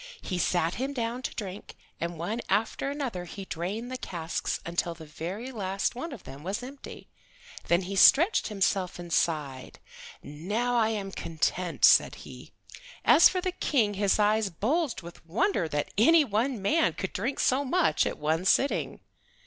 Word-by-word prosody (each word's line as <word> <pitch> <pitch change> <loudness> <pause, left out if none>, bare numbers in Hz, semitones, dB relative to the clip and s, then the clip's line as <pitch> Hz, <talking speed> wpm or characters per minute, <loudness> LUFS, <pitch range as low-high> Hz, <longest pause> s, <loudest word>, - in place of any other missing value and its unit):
He 180 -2 -3
sat 175 -1 +1
him 275 +2 -2
down 240 -1 -3
to - - -5
drink, 200 -2 -7 0.2
and 170 0 -4
one 210 +9 -3
after 220 +7 0
another 260 -11 -4
he 195 +3 -8
drained 200 +9 -4
the 255 - -4
casks 165 -2 -3
until 170 0 -2
the 160 -1 -11
very 185 - -6
last 195 -4 -2
one 260 +7 -6
of 250 -8 -9
them 135 +2 -10
was 195 +8 -4
empty. 270 +2 -10 0.6
Then 170 +2 +2
he 195 +2 -5
stretched 325 - +6
himself 195 -3 0
and 175 -2 -7
sighed. 145 -6 -1 0.5
"Now 210 +12 -2
I 225 -2 +3
am 200 -3 -3
content," 170 +1 0
said - - +5
he. - - -12 0.5
As 335 - +8
for 370 - -2
the 370 - -1
King 240 - +1
his 200 0 +2
eyes 210 0 +2
bulged 235 - -1
with 170 -1 -12
wonder 185 - 0
that 145 -1 -3
any 320 +7 +6
one 235 +1 -1
man 310 +12 +2
could 190 - -5
drink 240 +9 -2
so 260 +2 +2
much 345 +6 +2
at - - -4
one 160 +3 0
sitting. 270 +8 +1
200 Hz, 170 wpm, -28 LUFS, 175-255 Hz, 0.6 s, As